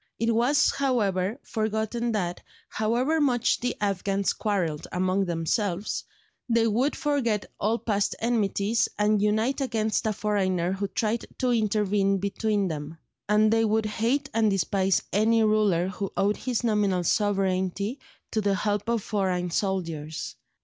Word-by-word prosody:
It 230 Hz, 0 st, +1 dB
was, 250 Hz, +6 st, +3 dB
however, 215 Hz, -6 st, 0 dB
forgotten 220 Hz, +2 st, -2 dB
that, 180 Hz, -4 st, -2 dB, 0.3 s
however 245 Hz, +9 st, +1 dB
much 245 Hz, -4 st, +2 dB
the 245 Hz, 0 st, -2 dB
Afghans 200 Hz, -1 st, 0 dB
quarrelled 175 Hz, -8 st, -2 dB
among 185 Hz, +2 st, +1 dB
themselves, 175 Hz, +3 st, -1 dB, 0.4 s
they 230 Hz, -1 st, +3 dB
would 240 Hz, +6 st, +1 dB
forget 250 Hz, -9 st, 0 dB
all 220 Hz, +3 st, +1 dB
past 205 Hz, -3 st, -1 dB
enmities 220 Hz, -1 st, +1 dB
and 210 Hz, 0 st, +2 dB
unite 220 Hz, +7 st, +1 dB
against 220 Hz, -4 st, 0 dB
a -, -, +2 dB
foreigner 190 Hz, -4 st, 0 dB
who 195 Hz, +1 st, -2 dB
tried 215 Hz, +4 st, -2 dB
to 250 Hz, -1 st, +1 dB
intervene 205 Hz, -3 st, +1 dB
between 200 Hz, +1 st, 0 dB
them; 155 Hz, -1 st, -5 dB, 0.3 s
and 215 Hz, +1 st, +4 dB
they 225 Hz, 0 st, +3 dB
would 220 Hz, 0 st, +1 dB
hate 235 Hz, +7 st, 0 dB
and 220 Hz, -1 st, +3 dB
despise 195 Hz, 0 st, +1 dB
any 225 Hz, +2 st, +3 dB
ruler 210 Hz, -5 st, +2 dB
who 195 Hz, 0 st, -4 dB
owed 205 Hz, +2 st, +2 dB
his 250 Hz, -2 st, -2 dB
nominal 205 Hz, -5 st, +1 dB
sovereignty 195 Hz, -, 0 dB, 0.3 s
to 220 Hz, -, 0 dB
the 200 Hz, -1 st, +1 dB
help 205 Hz, +2 st, -1 dB
of 230 Hz, -3 st, 0 dB
foreign 185 Hz, -4 st, -1 dB
soldiers. 165 Hz, -6 st, -3 dB
210 Hz, 140 wpm, -26 LUFS, 195-225 Hz, 0.4 s, and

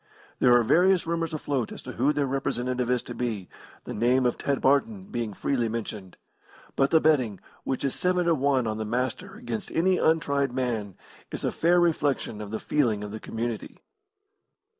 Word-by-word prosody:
There 125 Hz, -1 st, +6 dB
are 120 Hz, -, +3 dB
various 180 Hz, +8 st, +4 dB
rumours 165 Hz, 0 st, -1 dB
afloat 140 Hz, -6 st, -2 dB
as -, -, -7 dB
to -, -, -7 dB
who 135 Hz, +5 st, +2 dB
their 145 Hz, -1 st, 0 dB
representative 125 Hz, -2 st, -1 dB
is 125 Hz, -1 st, +1 dB
to -, -, -7 dB
be, 110 Hz, -7 st, -3 dB, 0.4 s
the -, -, -6 dB
name 125 Hz, +4 st, +2 dB
of 120 Hz, -, +2 dB
Ted 140 Hz, -1 st, -1 dB
Barton 185 Hz, +10 st, +2 dB
being 115 Hz, -3 st, -2 dB
freely 120 Hz, +3 st, -1 dB
mentioned; 105 Hz, -4 st, -5 dB, 0.6 s
but 135 Hz, 0 st, +3 dB
the 160 Hz, -, +5 dB
betting, 130 Hz, -, +2 dB, 0.3 s
which 130 Hz, -, -2 dB
is 135 Hz, -, 0 dB
seven 180 Hz, -1 st, +1 dB
to 170 Hz, -, +4 dB
one 135 Hz, -3 st, +2 dB
on 110 Hz, 0 st, -2 dB
the -, -, -1 dB
Master 125 Hz, -, -3 dB
against 220 Hz, -3 st, -5 dB
any 185 Hz, +2 st, +2 dB
untried 140 Hz, -5 st, +1 dB
man, 115 Hz, -7 st, -2 dB, 0.4 s
is -, -, -3 dB
a -, -, +1 dB
fair 175 Hz, +2 st, +3 dB
reflection 145 Hz, -9 st, 0 dB
of 105 Hz, -, -6 dB
the 110 Hz, +1 st, -3 dB
feeling 115 Hz, -8 st, 0 dB
of 105 Hz, -, -6 dB
the 110 Hz, -, -6 dB
community. 115 Hz, 0 st, -5 dB
130 Hz, 185 wpm, -26 LUFS, 115-160 Hz, 0.6 s, There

